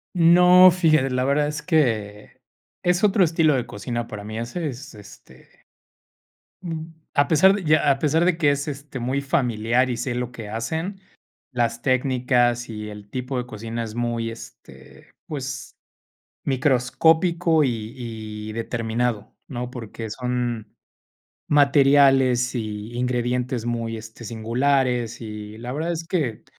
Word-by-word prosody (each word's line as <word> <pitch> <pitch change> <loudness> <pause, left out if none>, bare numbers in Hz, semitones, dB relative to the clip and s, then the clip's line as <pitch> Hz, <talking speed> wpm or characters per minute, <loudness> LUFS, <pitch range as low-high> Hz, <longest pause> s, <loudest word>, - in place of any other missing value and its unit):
No, 180 +2 +7
fíjate, 155 -6 +3
la 125 0 0
verdad 145 +2 +2
es 150 0 -4
que 115 - -1 0.4
es 180 +2 +1
otro 200 -1 +4
estilo 160 -3 +3
de 125 - -1
cocina 120 +3 -4
para 105 -1 -7
mí, 110 +1 -6
ese 125 +8 -4
es, 135 +2 -9
este, 105 -1 -17 1.0
mm, 165 -3 -5 0.3
a 145 -1 +3
pesar 190 +5 +5
de 205 - -4
ya, 155 -2 +4
a 135 - 0
pesar 160 +3 +2
de 180 -2 +2
que 150 -4 +3
es, 140 +1 -2
este, 140 -2 -6
muy 130 +3 -1
familiar 125 -4 +1
y 120 - -2
sé 120 +1 -3
lo 125 0 -3
que 115 -3 -8
hacen, 160 - -3 0.5
las 120 -2 -1
técnicas 125 -2 +1
y 105 -1 -6
el 105 -1 -11
tipo 130 +3 -4
de 125 - -2
cocina 115 0 -5
es 110 -1 -7
muy 120 -1 -2
este, 115 - -14 0.2
pues 130 -4 -5 0.7
microscópico 160 +5 +2
y 115 -4 -2 0.6
y - - -6
determinado, 115 -1 -2
¿no?, 125 -2 -5
porque 115 -2 -7
son 120 -2 -3 0.8
materiales 135 -3 +4
y 110 -1 -5
ingredientes 125 0 -1
muy, 115 -1 -2
este, 110 +1 -10
singulares, 120 +2 0
y 105 -1 -8
la 120 +2 -6
verdad 160 +5 -2
es 165 0 -5
que, 150 - -2
125 Hz, 140 wpm, -23 LUFS, 115-150 Hz, 1.0 s, No